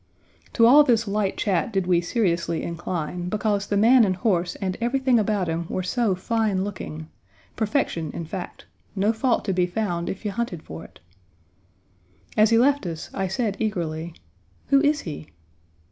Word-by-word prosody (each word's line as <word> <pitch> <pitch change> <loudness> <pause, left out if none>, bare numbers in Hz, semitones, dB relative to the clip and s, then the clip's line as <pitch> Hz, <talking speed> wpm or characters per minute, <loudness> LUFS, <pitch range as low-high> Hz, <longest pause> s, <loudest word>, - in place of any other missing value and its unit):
To 230 - +5
all 285 +6 +8
this 230 -5 +2
light 200 -1 -1
chat 195 +1 0
did 195 -3 0
we 175 -1 +3
seriously 170 -4 0
incline, 175 +1 -4
because 205 -1 -1
the 205 - 0
man 235 +4 +6
and 190 -3 +1
horse 180 -2 0
and 185 -1 -3
everything 255 0 +2
about 205 -3 0
him 165 +1 -2
were 185 - -2
so 210 +1 0
fine 210 0 0
looking; 160 -6 -6 0.5
perfection, 210 - -1
in 170 - -6
fact; 180 +3 -7 0.3
no 205 +3 +2
fault 235 +1 0
to 195 - 0
be 180 -1 +1
found 175 -3 -2
if 195 - -6
you 205 - -1
hunted 195 -7 -4
for 80 +1 -9
it. - - -16 1.4
As 215 0 +5
he 230 - +4
left 275 -3 +3
us, 165 -2 -6
I 195 -1 -1
said 200 +2 -2
eagerly, 170 -6 -3 0.5
"Who 275 0 +5
is 295 0 +2
he?" 155 -2 -7
195 Hz, 170 wpm, -24 LUFS, 175-225 Hz, 1.4 s, all